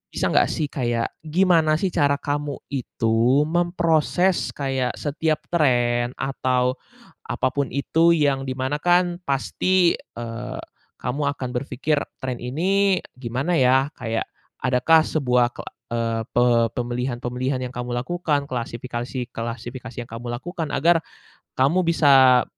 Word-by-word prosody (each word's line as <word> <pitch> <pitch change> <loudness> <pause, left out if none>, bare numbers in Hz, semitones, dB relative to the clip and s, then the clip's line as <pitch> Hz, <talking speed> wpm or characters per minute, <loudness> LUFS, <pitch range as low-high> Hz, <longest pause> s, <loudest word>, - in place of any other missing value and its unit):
bisa - - 0
nggak - - +4
sih 150 -2 -2
kayak, 120 -3 -1 0.2
gimana 165 -2 +3
sih 185 +4 -1
cara 140 -3 +2
kamu 145 0 -3 0.2
itu 120 +1 +1
memproses 175 +2 +1
kayak 135 -3 -1
setiap 155 +1 -1
tren, 120 -6 +2
atau 130 -1 0 0.5
apapun 140 +1 -1
itu, 165 +4 +3
yang 140 -3 +1
di 130 - -3
mana 130 +3 -2
kan 175 +1 +2
pasti, 175 +6 +2
eee, 120 +2 -7 0.4
kamu 130 +4 -2
akan 130 -2 -4
berpikir 140 +3 -1 0.2
tren 125 -2 -3
ini 185 +9 +1 0.2
gimana 130 +7 -1
ya? 130 +2 +3
Kayak 115 -1 -1 0.4
adakah 135 +6 +4
sebuah 125 -6 +1
ke - - -18 0.3
eee, 115 -1 -1
pe 120 0 +3 0.3
pemilihan-pemilihan 125 +1 -2
yang 125 - -12
kamu 125 0 -4
lakukan, 145 +3 -1
klasifikasi-klasifikasi 120 0 -5
yang 120 - -6
kamu 120 +1 -6
lakukan, 165 +5 -4
agar 165 +1 +3 0.5
kamu 150 +8 +3
bisa 135 -6 +6
135 Hz, 120 wpm, -23 LUFS, 125-155 Hz, 0.5 s, bisa